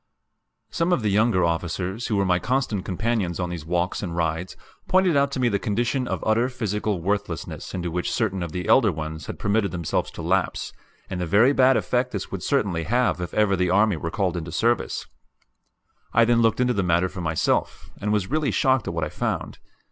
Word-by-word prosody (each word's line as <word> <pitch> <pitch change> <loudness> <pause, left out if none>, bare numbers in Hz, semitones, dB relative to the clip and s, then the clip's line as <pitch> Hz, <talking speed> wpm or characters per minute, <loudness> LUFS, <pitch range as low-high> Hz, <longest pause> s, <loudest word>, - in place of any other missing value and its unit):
Some 170 +2 0
of 150 -10 +1
the 105 - +1
younger 105 -2 +3
officers 90 +6 -2
who 110 - 0
were 100 -1 +2
my 90 -1 +2
constant 125 -4 -1
companions 100 -2 -1
on 90 -1 -2
these 80 -3 -6
walks 90 +1 -1
and 85 -5 -4
rides 85 +1 -2 0.3
pointed 185 -3 +3
out 140 0 +3
to 130 - -2
me 125 - +3
the 100 -3 +1
condition 120 +5 -1
of - - -3
utter 115 +3 +2
physical 105 -6 -2
worthlessness 100 -4 -3
into 85 -2 -3
which 90 +1 -2
certain 95 -5 -1
of 85 -2 -4
the 90 +1 -4
elder 115 -6 +5
ones 80 -1 -6
had - - -6
permitted 105 0 +1
themselves 85 -3 -2
to - - -7
lapse, - - 0 0.3
and 90 -1 -4
the 90 - -2
very 110 - +5
bad 130 -1 +5
effect 125 0 0
this 100 -3 -4
would 95 - -4
certainly 100 - 0
have 105 -4 +1
if 90 - -4
ever 105 -2 +3
the 90 -1 +1
army 100 +1 +3
were 80 +1 -4
called 90 0 -1
into 85 -1 -5
service. 120 +8 0 1.1
I 115 0 +5
then 120 0 +3
looked 115 0 +2
into 125 0 +2
the 100 - 0
matter 90 0 +2
for 90 - -7
myself, 80 -2 -1
and 105 - -1
was 105 -3 +1
really 155 -2 +1
shocked 130 -5 +2
at 85 - -3
what 80 - -1
I 75 - -2
found. - - -3
100 Hz, 210 wpm, -24 LUFS, 90-120 Hz, 1.1 s, elder